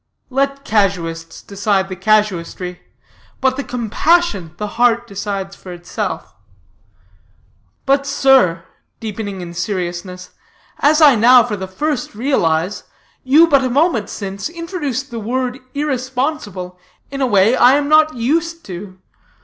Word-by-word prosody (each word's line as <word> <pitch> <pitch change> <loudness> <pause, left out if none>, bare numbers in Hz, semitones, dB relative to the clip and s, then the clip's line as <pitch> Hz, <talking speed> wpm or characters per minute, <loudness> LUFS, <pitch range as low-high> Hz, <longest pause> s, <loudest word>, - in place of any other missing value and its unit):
"Let 275 +1 -1
casuists 170 -6 -1
decide 200 -1 0
the 190 - -6
casuistry, 185 -3 0 0.6
but 260 -1 +1
the 280 - -3
compassion 235 - 0
the 210 - -3 0.2
heart 240 -1 +3
decides 200 -2 -5
for 185 - -11
itself. 175 0 -5 1.5
But, 275 0 +2
sir," 190 -14 +3 0.3
deepening 205 -3 -5
in 170 -1 -8
seriousness, 180 0 -4 0.5
"as 305 +2 +4
I 290 -3 +8
now 245 +2 +6
for 225 -3 -3
the 190 -1 -6
first 250 +5 -3
realize, 190 - 0 0.4
you 290 +6 +6
but 275 -4 +3
a 255 - 0
moment 270 - +1
since 195 +3 -5
introduced 325 -6 -4
the 230 - -4
word 250 +3 -2 0.2
irresponsible 255 - -3 0.3
in 275 0 -4
a 260 - +2
way 205 +2 +4
I 255 +2 +6
am 290 0 0
not 310 -1 +4
used 330 +7 -1
to. 185 +1 -8
225 Hz, 130 wpm, -18 LUFS, 190-275 Hz, 1.5 s, I